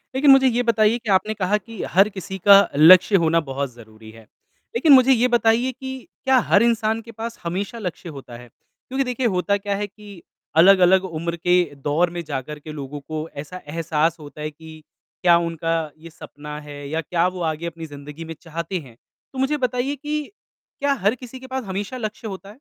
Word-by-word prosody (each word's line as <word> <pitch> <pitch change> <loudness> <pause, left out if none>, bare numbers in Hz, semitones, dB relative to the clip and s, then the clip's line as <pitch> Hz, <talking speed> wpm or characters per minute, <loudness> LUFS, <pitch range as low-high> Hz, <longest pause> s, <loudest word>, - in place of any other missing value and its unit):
लेकिन 275 +1 +5
मुझे 270 -1 +6
ये 245 0 +1
बताइए 225 -1 +3
कि 230 -2 -8
आपने 205 +3 +2
कहा 205 0 0
कि 220 +1 -10
हर 195 +3 +5
किसी 190 -1 -7
का 200 0 +10 0.2
लक्ष्य 180 +6 +7
होना 165 +1 +3
बहुत 135 0 -3
ज़रूरी 110 -1 -15
है। 115 0 -15 0.5
लेकिन 280 +5 +5
मुझे 260 0 +7
ये 245 0 +3
बताइए 240 +1 +2
कि 265 +1 -8 0.3
क्या 265 0 +4
हर 205 - +5
इंसान 225 -1 +1
के 230 +1 -12
पास 230 +1 -7
हमेशा 190 +6 -4
लक्ष्य 180 -3 -6
होता 125 -3 -10
है? 125 0 -13
क्योंकि 265 - -6
देखिए 250 -1 -1
होता 200 +3 +1
क्या 200 0 -3
है 205 +1 -3
कि 205 -3 -14 0.4
अलग-अलग 185 +1 +6
उम्र 170 -1 -4
के 180 +1 +3
दौर 145 +5 0
में 170 0 -6
जाकर 150 0 -6
के 155 +1 -9
लोगों 145 -1 -7
को 155 +2 -6
ऐसा 165 +6 -7
एहसास 160 +1 0
होता 150 0 -11
है 155 0 -4
कि 160 +1 -13 0.4
क्या 175 -2 +6
उनका 165 -2 -2
ये 165 +2 -12
सपना 150 -2 -10
है? 145 -1 -9
या 160 +2 -1
क्या 170 +2 0
वो 185 0 -5
आगे 155 +2 -6
अपनी 165 0 -7
ज़िंदगी 145 +2 -10
में 165 - -7
चाहते 170 +2 -4
हैं? 130 -7 -14 0.4
तो 260 - -6
मुझे 270 +3 +1
बताइए 250 +1 -1
की 300 +2 -3 0.6
क्या 285 0 +2
हर 215 -3 0
किसी 255 +1 -11
के 260 - -11
पास 260 0 -4
हमेशा 200 +4 -5
लक्ष्य 220 -1 -5
होता 195 -1 -8
है? 210 - -13
185 Hz, 205 wpm, -22 LUFS, 155-230 Hz, 0.6 s, का